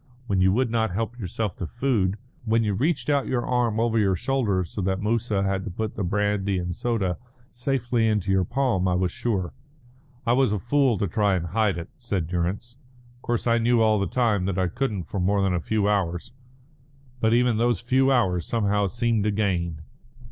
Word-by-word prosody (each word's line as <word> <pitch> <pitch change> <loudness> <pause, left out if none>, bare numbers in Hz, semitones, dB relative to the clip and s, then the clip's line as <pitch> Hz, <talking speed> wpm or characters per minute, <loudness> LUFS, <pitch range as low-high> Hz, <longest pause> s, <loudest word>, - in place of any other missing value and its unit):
When 100 -5 +1
you 95 0 +4
would 120 +3 +1
not 115 -1 +1
help 115 +6 -3
yourself 105 +1 -3
to 90 - -4
food, 110 -6 0 0.3
when 115 0 +2
you 105 -2 0
reached 145 - 0
out 140 -2 +1
your 125 -2 -1
arm 120 -3 +1
over 115 -1 +2
your 95 -3 +2
shoulder 105 -4 0
so 95 +4 -5
that 95 0 0
Moussa 105 -1 0
had 95 -1 -1
to 105 - -5
put 110 +4 -4
the 100 - -3
brandy 100 +1 0
and 90 0 -3
soda 100 -8 -1 0.3
safely 120 -2 0
into 105 -3 0
your 95 -1 +3
palm, 120 -4 0
I 90 - +2
was 90 -1 0
sure." 95 -6 -2 0.7
"I 120 - +3
was 130 -3 +3
a 105 - +1
fool 125 +2 +2
to 100 - 0
try 100 +2 +1
and 85 -2 -2
hide 100 +1 +1
it," 85 - -6
said 100 -9 -2
Durrance. 90 +9 -3 0.4
"Of - - -29
course 120 -1 -2
I 115 -1 +3
knew 115 0 +3
all 110 -1 +3
the 100 - 0
time 110 -7 +1
that 95 -1 -2
I 95 -1 +1
couldn't 110 -3 -2
for 95 +5 -5
more 100 +2 +2
than 95 -1 +1
a 90 - +1
few 105 +4 0
hours. 90 -3 -1 0.9
But 110 0 +3
even 120 -2 +3
those 120 -3 +2
few 130 +3 +2
hours 90 -10 +1
somehow 105 -3 +1
seemed 115 0 0
a - - +2
gain." 85 -6 -1
105 Hz, 205 wpm, -25 LUFS, 95-120 Hz, 0.9 s, you